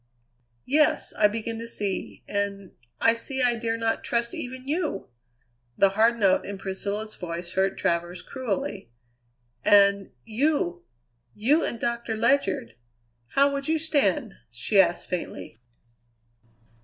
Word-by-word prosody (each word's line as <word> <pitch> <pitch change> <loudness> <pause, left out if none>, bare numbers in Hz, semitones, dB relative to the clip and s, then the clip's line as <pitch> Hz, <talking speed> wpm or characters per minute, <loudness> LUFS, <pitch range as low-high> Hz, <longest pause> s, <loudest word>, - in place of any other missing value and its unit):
"Yes, 295 +3 +2
I 210 - +4
begin 225 +1 -4
to 230 - -6
see. 205 -4 -4
And 200 -2 -2 0.3
I 230 - +5
see 260 +3 -2
I 245 -1 +4
dare 230 0 -2
not 225 0 -1
trust 235 0 -1
even 255 +1 -6
you!" 305 - -2 0.7
The 195 - +5
hard 225 +4 +3
note 195 -3 +4
in 200 0 -6
Priscilla's 200 +3 -4
voice 170 0 -6
hurt 190 +1 0
Travers 175 +1 -1
cruelly. 225 - -4 0.7
"And 200 -1 +5 0.2
you, 225 - 0 0.5
you 285 +10 +3
and 235 - -2
Doctor 235 -1 -2
Ledyard 220 - +1 0.6
how 280 +1 +4
would 275 +1 -3
you 320 +1 +2
stand?" 295 -7 +1 0.2
she 120 - +3
asked 175 -2 -1
faintly. 170 -9 -5
220 Hz, 130 wpm, -26 LUFS, 195-250 Hz, 0.7 s, I